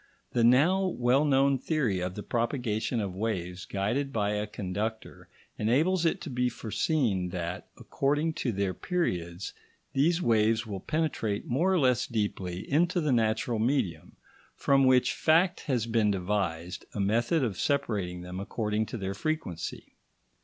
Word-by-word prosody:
The 120 - +2
now 145 +11 +5
well 130 -3 +2
known 135 -1 +3
theory 130 - 0
of 90 +1 -3
the 105 - -6
propagation 120 -1 -1
of 100 -4 -3
waves 90 -3 -3
guided 115 +8 -1
by 105 -4 0
a 105 0 -1
conductor 105 +3 -5 0.3
enables 160 +11 +2
it - - 0
to - - -6
be 125 0 +1
foreseen 110 - 0
that, 90 0 -4
according 150 +4 0
to 125 - 0
their 100 -2 -1
periods, 90 - -2 0.4
these 165 +5 +3
waves 110 -5 +2
will 100 -3 -5
penetrate 140 - -1
more 160 +10 +1
or 190 - +3
less 130 -7 +2
deeply 100 -5 -3
into 170 +5 +2
the 150 -4 +1
natural 115 -1 +1
medium, 110 - -1 0.4
from 135 -1 +3
which 130 -1 +4
fact 170 +3 +3
has 125 -6 +1
been 115 -2 +2
devised 90 -3 -2
a - - -3
method 115 +10 +2
of 105 -7 -2
separating 105 -11 -1
them 90 +1 -6
according 105 +1 -2
to - - -5
their 95 -2 -3
frequency. 105 - -4
115 Hz, 150 wpm, -29 LUFS, 100-140 Hz, 0.4 s, now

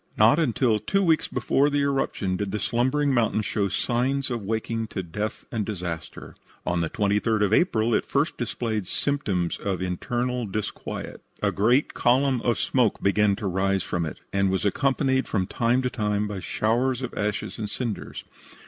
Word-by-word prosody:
Not 115 +9 +6
until 120 -6 +2
two 195 - +1
weeks 160 -3 +3
before 140 +2 +2
the 145 0 +1
eruption 135 -9 0
did 100 +1 -2
the 105 - -2
slumbering 130 +7 +1
mountain 110 -3 +2
show 100 -1 0
signs 130 +6 0
of 120 -2 -2
waking 110 +2 -2
to 95 -3 -4
death 105 +6 -4
and 110 -2 -1
disaster. 90 -6 -6 0.3
On 85 -1 0
the 85 - -1
23d 105 +1 +1
of 105 +1 +2
April 115 -7 +3
it - - +1
first 145 +4 +1
displayed 110 -4 -2
symptoms 100 -11 -1
of 100 -4 -2
internal 120 +7 -2
disquiet. 105 +2 -5 0.2
A - - +3
great 120 +8 +2
column 130 0 +2
of 120 -1 +1
smoke 125 -5 +1
began 100 0 +3
to 105 +1 -6
rise 95 +1 +1
from 85 -2 -2
it, - - -7 0.2
and 100 0 +2
was 95 +1 0
accompanied 130 +3 +1
from 95 -3 0
time 120 +6 +1
to 125 - +1
time 105 -2 0
by 105 -2 -4
showers 120 +7 0
of 125 - -4
ashes 105 +2 -3
and 105 -2 -3
cinders. 115 -1 -4
110 Hz, 175 wpm, -25 LUFS, 100-125 Hz, 0.3 s, Not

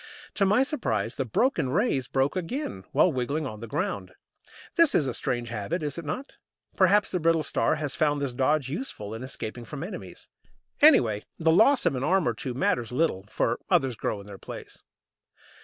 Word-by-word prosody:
To 195 - +2
my 210 +7 +4
surprise, 115 - -1
the 135 - -2
broken 200 - +1
"rays" 140 - +1
broke 135 +4 0
again 185 - -4
while 180 - +4
wriggling 140 +5 -1
on 110 -5 -6
the 115 - -7
ground. 170 - -3 0.6
This 335 -3 +5
is 150 - +3
a 130 - -2
strange 120 -1 -2
habit, 120 - -3
is 145 +1 -2
it 165 - -8
not? 260 - -5 0.4
Perhaps 200 +2 +4
the 180 - 0
Brittle 165 -1 +2
Star - - +1
has 145 -3 -2
found 145 -2 +1
this 140 -3 -2
dodge 135 +2 +1
useful 130 - -5
in 115 - -6
escaping 120 -2 -6
from 140 +5 -7
enemies. 190 - -8 0.5
Anyhow, 120 - +6 0.2
the 160 0 +3
loss 225 +10 +5
of - - +3
an 130 0 -3
arm 185 0 +2
or 120 - +1
two 120 +2 -5
matters 120 -3 0
little, 125 - 0
for 115 +2 0
others 130 -3 +2
grow 105 - -3
in 100 - -11
their 100 -1 -10
place. - - -9
145 Hz, 190 wpm, -27 LUFS, 120-185 Hz, 0.6 s, Anyhow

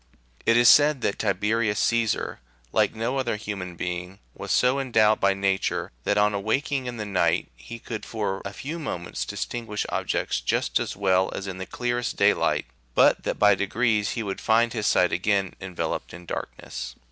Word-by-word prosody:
It 115 - +5
is 120 0 +6
said 145 +1 +6
that 100 - -1
Tiberius 105 +1 +1
Caesar, 115 -2 0 0.3
like 105 0 +2
no 120 +5 -1
other 120 -4 -1
human 100 -4 -5
being, 90 +2 -4 0.2
was 100 - -6
so 125 +7 +3
endowed 110 -5 +3
by 100 0 +3
Nature, 95 -1 -1
that 105 - +2
on 105 0 +3
awaking 130 +6 -1
in 120 -1 -5
the 110 - -3
night95 100 -3 +1
he 90 - -9
could 115 -1 -6
for 105 -4 -3
a 100 - -5
few 150 +11 -6
moments 85 - -4
distinguish 115 - -4
objects - - -1
just - - 0
as - - -3
well 95 -1 +2
as 95 - -5
in 95 -1 -6
the 95 - -5
clearest 120 0 -2
daylight, - - +2 0.3
but - - +5
that - - -1
by 105 -1 +6
degrees 105 +1 +1
he 115 - -3
would 100 -2 -4
find 115 +1 +3
his 110 -3 -1
sight 90 - +3
again 100 0 0
enveloped 85 -4 -4
in 85 0 -12
darkness. 65 -5 -6
105 Hz, 180 wpm, -25 LUFS, 95-115 Hz, 0.3 s, is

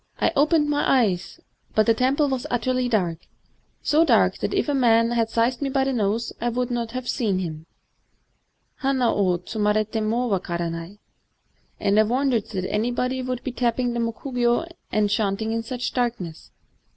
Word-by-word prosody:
I - - +2
opened 300 +1 +3
my 290 -3 +3
eyes; 185 -4 -2 0.4
but 215 - +4
the 230 - +5
temple 265 +5 +2
was 265 -2 -2
utterly 250 +1 0
dark, 180 -8 0 0.4
— - - -43
so 310 +2 +5
dark - - +3
that - - -2
if - - 0
a 290 - +1
man 230 -3 +4
had 230 -2 +1
seized 235 +3 +1
me 280 - 0
by 270 0 +1
the 270 0 0
nose 225 0 -1
I 240 - +1
could 245 +1 -2
not 235 -2 -2
have 255 -1 -4
seen 210 -7 0
him 160 -3 -5 1.1
[bana 265 -3 +2
wo 185 -3 +2
tsutnariti 215 +3 -1
mo 230 +3 0
wakaranat]; 170 -2 -3 0.8
and 200 +1 +3
I - - +8
wondered 245 0 +1
that 185 -3 -4
anybody 245 +4 -1
should 255 -1 -3
be 260 - -3
tapping 245 0 0
the 235 - -2
mokugyo 240 +4 0 0.2
and 215 -1 +2
chanting 205 +1 0
in 230 0 -1
such 245 +2 -4
darkness. 230 -10 -3
235 Hz, 175 wpm, -24 LUFS, 210-255 Hz, 1.1 s, I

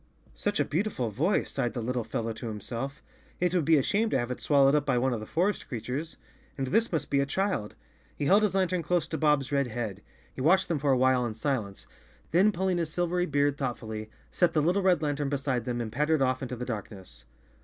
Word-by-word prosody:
"Such 205 +1 -2
a - - +3
beautiful 155 - -1
voice," 160 - 0
sighed 125 -3 -2
the 120 - -2
little 125 0 -1
fellow 115 +1 -3
to 115 +2 -7
himself. 120 +6 -5 0.2
" - - -31
It 180 0 +1
would 175 -5 +1
be 160 0 +5
a 135 - +2
shame 220 - +1
to - - +1
have 120 0 -2
it 125 - -5
swallowed 140 -2 +4
up 150 -2 +3
by 135 -4 +1
one 130 +1 +1
of 115 - -2
the 110 - -8
forest 185 +5 0
creatures. 135 +6 -5 0.4
And 135 - -1
this 225 - +1
must 155 -4 -2
be 140 - +3
a 140 - +2
child." 180 - -1 0.4
He 145 - -3
held 200 +8 +5
his 210 -3 +1
lantern 185 -2 +1
close 175 +1 0
to 160 - -3
Bob's 150 -3 +2
red 140 -2 +1
head. 110 -4 -4 0.3
He - - -6
watched 180 +7 +3
them 165 -4 0
for 140 0 +2
a 130 - +4
while 130 0 +3
in 110 - -5
silence, 110 -5 -3 0.5
then 190 +6 +5
pulling 185 -1 0
his 165 -2 -2
silvery 175 +1 0
beard 145 -1 +1
thoughtfully, 110 -5 -4 0.2
set 175 -2 +2
the 155 - +3
little 180 +5 +2
red 185 -4 +3
lan¬ 145 -2 0
tern 145 -1 -1
beside 135 -4 -1
them 120 -1 -2
and 115 -2 -3
pattered 150 +4 +2
off 130 0 0
into 125 -1 -4
the 125 +1 -5
darkness. 100 - -7
140 Hz, 240 wpm, -28 LUFS, 120-170 Hz, 0.5 s, be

